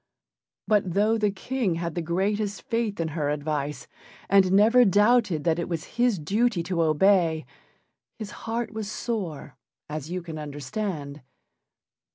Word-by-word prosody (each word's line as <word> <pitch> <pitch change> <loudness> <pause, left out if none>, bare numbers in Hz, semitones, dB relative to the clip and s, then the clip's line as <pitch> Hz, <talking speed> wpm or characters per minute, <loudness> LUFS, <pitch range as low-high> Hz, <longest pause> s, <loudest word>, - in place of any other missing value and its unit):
But 200 -5 +1
though 215 +3 +3
the 210 -1 +2
King 205 -1 -2
had 170 0 -3
the 175 - -2
greatest 200 +5 -1
faith 230 -4 -2
in 165 -1 -1
her 150 -2 -2
advice, 150 -2 -3 0.4
and 195 -2 +5
never 220 +6 +6
doubted 205 -5 +3
that 165 -1 +1
it 170 - -3
was 165 +5 -5
his 245 -5 +3
duty 200 +4 0
to 170 -1 -1
obey, 165 0 +3 0.7
his 215 -3 -7 0.2
heart 235 0 -2
was 215 -2 -4
sore, 170 - -4 0.3
as 150 0 -5
you 180 0 -4
can 160 -2 -7
understand. 145 +1 -5
185 Hz, 145 wpm, -26 LUFS, 155-210 Hz, 0.7 s, never